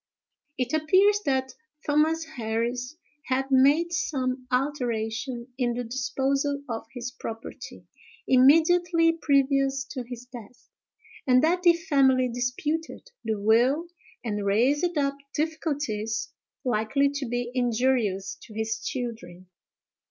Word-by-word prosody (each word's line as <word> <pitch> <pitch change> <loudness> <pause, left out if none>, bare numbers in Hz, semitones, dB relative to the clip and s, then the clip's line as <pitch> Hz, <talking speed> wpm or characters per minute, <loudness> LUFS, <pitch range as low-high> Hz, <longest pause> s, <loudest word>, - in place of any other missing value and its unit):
It 255 +3 -2
appears 380 +7 +4
that 265 -1 0 0.3
Thomas 310 +2 +2
Harris 245 -1 -3 0.3
had 270 +1 -1
made 290 +6 +4
some 255 -5 -2
alteration 245 -2 -2
in 240 -2 +1
the 245 - -2
disposal 275 +3 -1
of 225 -2 -5
his 245 -1 -6
property, 225 -4 -8 0.4
immediately 330 +5 +5
previous 275 -1 +2
to 260 - -4
his 245 0 -8
death; 245 -2 -13 0.6
and 255 0 +5
that 350 +3 +2
the 345 -1 +6
family 275 -7 +3
disputed 295 - -3
the 220 -2 -2
will 245 +10 +3 0.3
and 210 -3 -2
raised 280 - +2
up 280 -1 0 0.2
difficulties 290 -6 -2 0.3
likely 245 +4 +2
to 285 -2 -4
be 245 0 -3
injurious 235 -6 0
to 215 - -13
his 220 0 -2
children. 185 -8 -6
260 Hz, 115 wpm, -26 LUFS, 235-290 Hz, 0.6 s, the